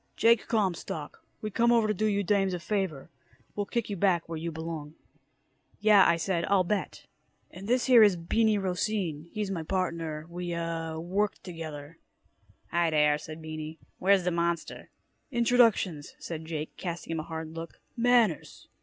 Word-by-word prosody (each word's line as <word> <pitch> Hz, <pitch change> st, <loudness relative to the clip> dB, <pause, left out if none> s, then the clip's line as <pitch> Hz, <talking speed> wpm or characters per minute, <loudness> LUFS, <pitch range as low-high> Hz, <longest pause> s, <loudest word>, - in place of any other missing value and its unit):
"Jake 230 Hz, 0 st, +4 dB
Comstock. 185 Hz, -8 st, -2 dB, 0.2 s
We 215 Hz, -, -3 dB
come 235 Hz, +4 st, +3 dB
over 230 Hz, -2 st, +4 dB
to 215 Hz, -, +1 dB
do 215 Hz, +2 st, 0 dB
you 200 Hz, -1 st, +1 dB
dames 195 Hz, -1 st, +1 dB
a -, -, -4 dB
favor. 170 Hz, -6 st, -3 dB, 0.4 s
We'll 205 Hz, -1 st, -2 dB
kick 235 Hz, 0 st, -1 dB
you 205 Hz, -, -3 dB
back 180 Hz, -3 st, +2 dB
where 165 Hz, -1 st, -5 dB
you 170 Hz, +1 st, -3 dB
belong." 160 Hz, -1 st, -6 dB, 0.8 s
"Yeah," 210 Hz, -2 st, +6 dB
I 170 Hz, -, +4 dB
said, 170 Hz, 0 st, -1 dB
"I'll 195 Hz, -2 st, +3 dB
bet." 205 Hz, +3 st, -3 dB, 0.5 s
"And 195 Hz, +2 st, -9 dB
this 250 Hz, +2 st, +2 dB
here 250 Hz, -3 st, +7 dB
is 205 Hz, -3 st, +6 dB
Beany 215 Hz, +6 st, +2 dB
Rocine. 180 Hz, -4 st, -2 dB
He's 210 Hz, -2 st, -3 dB
my 175 Hz, -4 st, -2 dB
partner. 165 Hz, -3 st, -2 dB
We 175 Hz, 0 st, -4 dB
uh 165 Hz, -1 st, -3 dB
work 190 Hz, +5 st, 0 dB
together." 160 Hz, -3 st, -8 dB, 0.7 s
"Hi 170 Hz, -1 st, +2 dB
dere," 150 Hz, -1 st, +3 dB
said 155 Hz, +1 st, -9 dB
Beany. 155 Hz, 0 st, -6 dB, 0.2 s
"Where's 195 Hz, 0 st, +4 dB
da 180 Hz, -, 0 dB
monster?" 170 Hz, -1 st, -2 dB, 0.4 s
"Introductions," 235 Hz, -, +2 dB
said 160 Hz, -1 st, -6 dB
Jake, 155 Hz, -1 st, -5 dB
casting 170 Hz, -2 st, -5 dB
him 165 Hz, -, -1 dB
a -, -, -3 dB
hard 160 Hz, -1 st, -5 dB
look. 165 Hz, +1 st, -8 dB, 0.2 s
"Manners." 235 Hz, -, +2 dB
175 Hz, 165 wpm, -29 LUFS, 160-205 Hz, 0.8 s, here